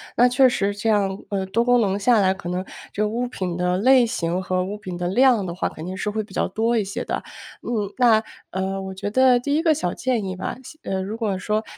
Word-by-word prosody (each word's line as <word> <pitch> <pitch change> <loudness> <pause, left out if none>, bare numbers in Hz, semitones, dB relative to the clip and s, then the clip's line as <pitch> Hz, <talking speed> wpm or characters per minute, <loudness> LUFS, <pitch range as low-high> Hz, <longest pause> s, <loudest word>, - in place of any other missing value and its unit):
那 245 +1 +5
确 255 +2 +5
实 205 -4 0
这 210 +2 -4
样 200 -2 0
呃， 195 -1 0
多 230 +5 +1
功 245 0 +4
能 195 -2 +1
下 225 +3 +3
来， 190 -1 +3
可 175 -2 -7
能 180 +1 -2 0.3
这 205 - -3
个 210 - +1
物 240 +3 -2
品 185 -7 -4
的 180 0 +1
类 255 +3 +5
型 180 -7 -1
和 185 0 0
物 200 +3 -5
品 185 -3 -7
的 175 0 -2
量 240 +2 +4
的 175 -2 -5
话 185 - -1
肯 160 +2 -8
定 185 +1 -5
是 210 +2 -2
会 215 +1 -1
比 210 - -14
较 - - +1
多 225 +4 0
一 215 - +2
些 195 0 -4
的。 - - -3 0.4
嗯， 210 -4 -2
那 230 -3 +5 0.3
呃， 190 +1 -2
我 190 0 -6
觉 195 +2 -4
得 255 +2 +4
第 285 +4 -1
一 320 - +1
个 320 -2 +4
小 280 - -2
建 250 -4 -1
议 185 -1 -4
吧， 185 - -4
先 310 +5 -12
呃， 190 - 0
如 205 +4 -5
果 215 -4 -1
说 215 +3 -1
205 Hz, 280 characters per minute, -23 LUFS, 190-240 Hz, 0.4 s, 那